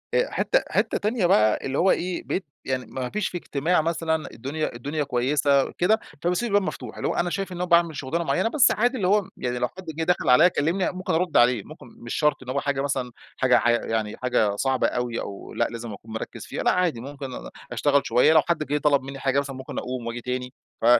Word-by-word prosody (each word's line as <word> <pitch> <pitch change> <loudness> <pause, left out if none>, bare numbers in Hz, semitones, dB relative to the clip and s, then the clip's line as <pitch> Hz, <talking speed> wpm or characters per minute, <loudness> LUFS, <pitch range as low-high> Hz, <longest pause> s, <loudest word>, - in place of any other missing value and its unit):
أ - - +2
حتة - - +2
حتة - - +1
تانية 210 -1 0
بقى 110 - +4
اللي 135 +1 -2
هو 190 +2 +4
إيه، 180 0 -1
بقيت 190 - -2 0.2
يعني 130 -1 -2
مافيش 135 +11 -3
في 180 - -4
اجتماع 160 +1 0
مثلًا، 160 -1 -1
الدنيا 140 +4 -4
الدنيا 145 +5 -2
كويسة 140 +1 +2
كده، 215 +6 +2 0.2
فباسيب 180 +7 +1
الباب 205 0 +3
مفتوح، - - -6
اللي - - -2
هو - - -1
أنا 175 - +1
شايف 195 +1 -3
إن 180 - -6
أنا 180 - -1
باعمل 170 -2 +3
شغلانة 145 +5 -2
معينة، 185 +7 +1
بس 275 +2 +5
عادي 245 +4 +1
اللي 190 -6 0
هو 200 0 +2
يعني 125 -1 -2
لو 125 - +1
حد 190 +6 -12
جه 165 - -1
دخل 180 +2 +1
عليَّ 155 +8 +7
كلمني 170 +4 0
ممكن 185 0 -3
أرد 170 +1 +1
عليه، 120 -3 +4
ممكن - - -12
مش 115 0 -6
شرط 150 -1 +2
اللي 130 0 -5
هو 140 - +1
حاجة 140 -1 -1
مثلًا 135 -3 -2 0.3
حاجة 130 -1 +4
ع 120 - +2
يعني 110 -2 -1
حاجة 110 -5 +1
صعبة 130 +3 +1
أوي، 120 -1 -2
أو 100 - -8
لأ - - +1
لازم 115 -2 -6
أكون 110 +3 -12
مركز 110 - -6
فيها، - - -4
لأ - - +4
عادي 175 -10 0
ممكن 140 +2 -7
أنا - - -8 0.2
أشتغل 140 +4 +2
شويّة، 125 +7 +5
لو 160 - +7
حد 170 0 -1
جه 145 +1 0
طلب 145 -2 +3
مني 135 +1 -7
حاجة 135 0 +1
مثلًا 140 -1 -4
ممكن 130 0 -8
أقوم 125 -2 -5
وأجي 115 +1 -4
تاني، 125 +1 -4 0.3
ف - - -1
145 Hz, 230 wpm, -25 LUFS, 125-175 Hz, 0.3 s, عليَّ